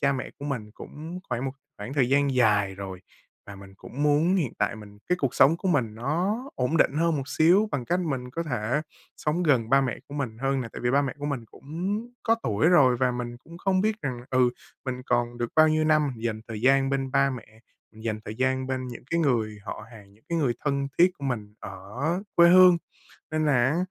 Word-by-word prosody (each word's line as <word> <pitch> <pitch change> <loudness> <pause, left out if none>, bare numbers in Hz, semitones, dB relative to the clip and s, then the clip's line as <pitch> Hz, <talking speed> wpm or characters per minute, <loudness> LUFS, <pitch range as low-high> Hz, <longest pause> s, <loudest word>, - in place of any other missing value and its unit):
cha 140 -1 +3
mẹ 130 -2 -4
của 140 - -8
mình 120 -7 -4
cũng 165 +4 -8
khoảng 125 +1 -2
một 135 - -2 0.3
khoảng 105 +7 -6
thời 135 -4 +2
gian 140 0 +2
dài 105 -5 +3
rồi 95 -1 -7 0.5
và 100 - -9
mình 95 0 -13
cũng 135 +7 -7
muốn 150 +5 +3
hiện 155 - -1
tại - - 0
mình 105 -1 -13
cái 180 - +2
cuộc 135 -4 0
sống 145 +5 +5
của 190 - -3
mình 125 -11 +1
nó 160 - -1 0.2
ổn 125 +5 0
định - - +4
hơn 165 0 +2
một 135 -1 -4
xíu 180 +9 +4
bằng 130 -4 -2
cách 175 +7 0
mình 135 -7 -3
có 165 +6 -3
thể 125 -1 -1 0.3
sống 155 +4 -1
gần 130 -9 +2
ba 135 0 +6
mẹ 130 -4 -2
của 145 - -9
mình 125 -6 -4
hơn 135 +1 0
nè. 120 - -5
Tại - - -7
vì 120 - +3
ba 140 +2 +3
mẹ 135 -3 -3
của 145 - -4
mình 135 -5 -3
cũng 175 - -4 0.2
có 225 0 +3
tuổi 110 +8 +2
rồi 140 -8 +5
và 125 +1 +2
mình 120 -1 -5
cũng 170 +6 -14
không 190 0 +1
biết 215 +1 +1
rằng, 125 -3 -3
ừ, 130 -2 +3 0.3
mình 130 -1 -4
còn 120 0 0
được 120 -1 -2
bao 155 0 +7
nhiêu 155 0 +2
năm 155 -2 +3
dành 110 -1 -3
thời 110 -2 -5
gian 135 +2 +3
bên 135 -1 -1
ba 140 0 +3
mẹ, 110 -3 -9 0.3
mình 110 0 -14
dành 110 -2 -2
thời 105 - -5
gian 130 +1 0
bên 130 -1 -3
những 120 - -9
cái 170 0 +1
người 115 -7 0
họ 105 - -6
hàng, 100 -3 -14
những 105 +3 -26
cái 170 - +1
người 135 -6 +1
thân 140 -1 0
thiết 180 +2 +6
của 140 - -7
mình 110 -6 -3
ở 125 - -4
quê 170 0 +8
hương. 180 -1 +8 0.5
Nên 155 0 0
là 125 -5 +3
á, - - -1
135 Hz, 240 wpm, -26 LUFS, 120-155 Hz, 0.5 s, quê